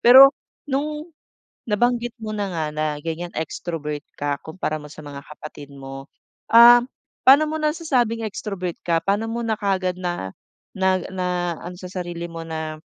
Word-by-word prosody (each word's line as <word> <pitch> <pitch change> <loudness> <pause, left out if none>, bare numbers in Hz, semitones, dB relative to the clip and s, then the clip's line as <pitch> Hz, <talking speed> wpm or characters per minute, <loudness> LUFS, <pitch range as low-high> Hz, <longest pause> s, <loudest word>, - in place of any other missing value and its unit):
Pero 265 +4 +10 0.3
nung 300 +3 -3 0.5
nabanggit 240 +2 +1
mo 215 -1 -4
na 200 -2 -2
nga, 160 -2 -1
na 155 0 0
ganiyan 165 +3 -4
extrovert 155 -2 -4 0.2
ka, 145 0 0
kumpara 160 -1 -3
mo 150 0 -11
sa - - -12
mga 140 -1 -8
kapatid 150 -1 -10
mo. 135 0 -9 0.4
Ah, 240 +1 +9 0.4
paano 285 +4 +7
mo 310 - -3
nasasabing 280 -8 0
extrovert 190 -4 -4
ka? 165 -1 +2
Paano 205 +5 0
mo 235 - -2
na 220 -1 +1
kaagad 190 -3 0
na 175 - -4 0.4
nag 190 -1 +1
na 180 -2 -1
naano 180 +1 -8
sa 185 - -7
sarili 175 -2 -4
mo 165 -1 -7
na 160 -1 -4
185 Hz, 160 wpm, -23 LUFS, 160-235 Hz, 0.5 s, Pero